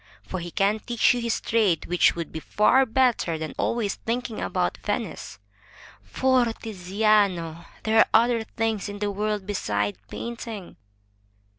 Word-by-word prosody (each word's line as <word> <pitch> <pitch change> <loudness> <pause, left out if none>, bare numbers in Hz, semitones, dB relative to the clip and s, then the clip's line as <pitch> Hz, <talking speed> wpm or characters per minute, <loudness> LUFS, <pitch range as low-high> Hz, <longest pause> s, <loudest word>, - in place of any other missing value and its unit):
For 185 - -5
he 175 0 -6
can 200 +4 +1
teach 235 +2 +2
you 245 - -2
his 235 -1 -1
trade, 210 -8 +1
which 180 0 +3
would 170 -2 -5
be 160 - -5
far 255 +10 +3
better 230 -9 +2
than 155 0 -5
always 230 -4 0
think 245 +2 -3
ing 220 - -5
about - - -1
Venice. - - -4 0.6
For, 260 -1 +2
Tiziano, 195 -5 0 0.2
there 220 0 +3
are - - +6
other 235 0 +3
things 220 -2 -2
in 205 - -6
the 205 0 -1
world 210 0 -2
beside 105 - -1
painting." 225 - -7
210 Hz, 150 wpm, -25 LUFS, 180-230 Hz, 0.6 s, are